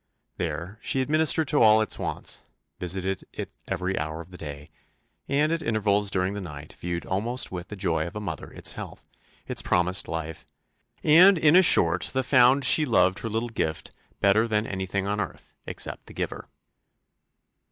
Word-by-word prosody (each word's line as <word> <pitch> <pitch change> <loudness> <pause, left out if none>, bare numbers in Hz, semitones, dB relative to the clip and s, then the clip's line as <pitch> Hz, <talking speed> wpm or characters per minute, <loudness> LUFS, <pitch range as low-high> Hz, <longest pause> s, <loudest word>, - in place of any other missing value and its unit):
There 85 +5 -4
she 135 - 0
administered 155 +3 +3
to 145 - +2
all 110 -1 +6
its 110 - -1
wants, - - -3 0.4
visited 95 +1 -2
it - - -7
every 95 +2 -2
hour 80 +1 -4
of 85 +2 -11
the 90 - -11
day, 75 -2 -8 0.6
and 150 +3 +2
at 165 0 -1
intervals 105 -5 +1
during 95 0 -1
the 100 - -5
night 75 -5 -9
viewed 85 -1 -5
almost 115 +7 -2
with 90 -1 -6
the 105 - -8
joy 85 -5 -1
of 85 - -10
a - - -3
mother 90 -7 -6
its - - -1
health, - - -9 0.4
its - - 0
promised 90 +1 +1
life 80 -1 -5 0.6
and 180 +5 +7
in 155 0 +4
a 185 - +8
short 85 - +4
the 130 0 0
found 130 +1 +4
she 155 - +6
loved 100 -8 +2
her 115 - -4
little 115 +2 -2
gift 80 -8 -3 0.3
better 105 +3 +3
than 105 -1 0
anything 95 0 -3
on 105 +1 -2
earth, - - -8
except - - -4
the - - -12
giver. - - -5
100 Hz, 175 wpm, -26 LUFS, 90-120 Hz, 0.6 s, a